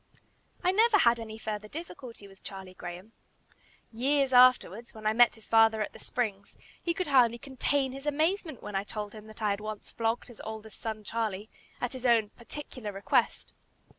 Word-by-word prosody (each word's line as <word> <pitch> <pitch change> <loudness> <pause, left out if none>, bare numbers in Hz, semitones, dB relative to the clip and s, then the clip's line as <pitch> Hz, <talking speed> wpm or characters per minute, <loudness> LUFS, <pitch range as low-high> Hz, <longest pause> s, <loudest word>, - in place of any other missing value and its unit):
I 365 - +4
never 435 +2 +5
had 235 -9 +4
any 220 -1 -7
further 210 -1 -4
difficulty 250 -7 -9
with 195 -1 -18
Charlie 190 -2 -9
Graham. 180 +4 -8 0.8
Years 270 +3 +2
afterwards, 245 -3 +5
when 215 -1 -10
I 215 - +3
met 240 +1 +6
his 220 - -12
father 225 -1 +5
at - - -7
the - - -12
Springs, 205 -5 -3 0.2
he 340 - 0
could 370 - -1
hardly 245 -5 +4
contain 270 +1 -1
his 275 +2 -8
amazement 315 - 0
when 210 - -6
I 195 - +1
told 210 0 -6
him 215 -1 -11
that 215 +1 -10
I 210 - +3
had 200 +1 -2
once 215 -1 -6
flogged 225 +1 -1
his 240 - -12
oldest 220 -1 -8
son 220 -1 -4
Charlie, 215 -2 -3 0.3
at 245 - -2
his 255 -1 -2
own 225 -3 +4
particular 240 -2 -8
request. 195 0 0
225 Hz, 185 wpm, -29 LUFS, 210-260 Hz, 0.8 s, met